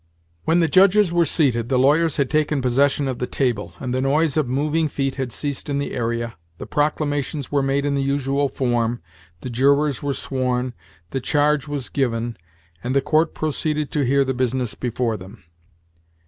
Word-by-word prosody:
When 170 +2 +3
the 165 - +3
judges 195 +1 +4
were 170 -1 +4
seated, 125 -7 +1
the 130 - +2
lawyers 150 +5 +3
had 140 -3 +2
taken 150 0 +1
possession 135 +3 +2
of 130 -2 -3
the 125 - -2
table, 120 -7 -1
and 125 -1 -3
the 130 - 0
noise 145 +2 +2
of 155 -4 +1
moving 150 +4 +1
feet 135 -2 -2
had 130 -3 -4
ceased 145 +2 -4
in 140 - 0
the 140 - -3
area, 115 -3 -2 0.2
the - - -7
proclamations 145 -1 -1
were 145 -1 +2
made 135 +1 0
in 145 - 0
the 140 - 0
usual 140 0 0
form, 120 -2 0 0.4
the 130 - -5
jurors 140 +3 +2
were 140 -1 -1
sworn, 125 -1 -1 0.4
the 135 - -2
charge 150 +1 +1
was 145 -3 -4
given, 120 -3 -1 0.5
and 125 +2 -2
the 140 - +4
court 155 +3 +1
proceeded 150 -1 -1
to 145 - 0
hear 135 +2 +3
the 130 - -1
business 125 -2 -1
before 120 -2 -2
them. 95 0 -13
140 Hz, 185 wpm, -22 LUFS, 125-150 Hz, 0.5 s, judges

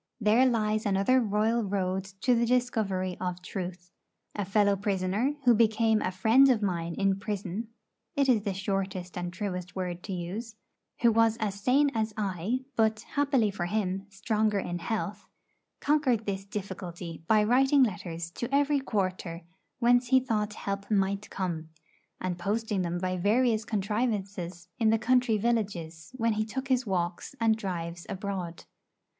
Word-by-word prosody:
There 225 +4 +4
lies 215 -2 +1
another 200 +7 +3
royal 220 +2 +1
road 190 -1 -1 0.2
to 250 +5 +4
the 235 0 +2
discovery 215 -7 0
of 180 -1 -3
truth. 180 -1 -6 0.4
A 205 - -2
fellow 200 +1 +3
prisoner, 200 +7 0
who 245 - +7
became 220 0 +3
a - - 0
friend 225 +9 +5
of 225 -5 +2
mine 170 -3 -1
in 195 -1 +1
prison 205 +1 -4 0.5
(it 280 -2 +2
is 240 -5 +4
the 200 -2 -2
shortest 190 -2 -3
and 175 0 -3
truest 180 -1 -4
word 180 -2 -3
to 200 - -6
use), 200 +6 -5 0.5
who 235 -1 +6
was 225 0 +3
as 205 -3 -3
sane 275 +5 +3
as 220 -2 -1
I, 200 +4 -1
but, 220 -1 +2
happily 275 -7 +2
for 175 -3 -3
him, 195 -1 -1
stronger 210 +1 0
in 175 -2 -3
health, 210 +2 -3 0.6
conquered 275 -7 +2
this 195 -1 -3
difficulty 180 -4 -6
by 215 -1 +5
writing 265 +5 +4
letters 170 -6 -3
to 240 +7 -4
every 285 +1 +3
quarter 185 -8 -2 0.3
whence 245 0 +4
he 260 +1 +5
thought 215 -4 -1
help 200 -1 -4
might 200 0 0
come, 165 -4 -3 0.5
and 180 -1 -3
posting 210 +1 -1
them 175 0 -1
by 185 +1 -1
various 220 +4 +2
contrivances 200 -5 -2
in 225 -2 +4
the 225 - +4
country 240 -1 +3
villages 195 -8 -2
when 230 -2 +1
he 215 +1 0
took 260 +5 -5
his 255 -2 +2
walks 175 +5 -2
and 225 -1 +4
drives 175 -5 -5
abroad. 190 -4 -4
205 Hz, 155 wpm, -29 LUFS, 185-230 Hz, 0.6 s, who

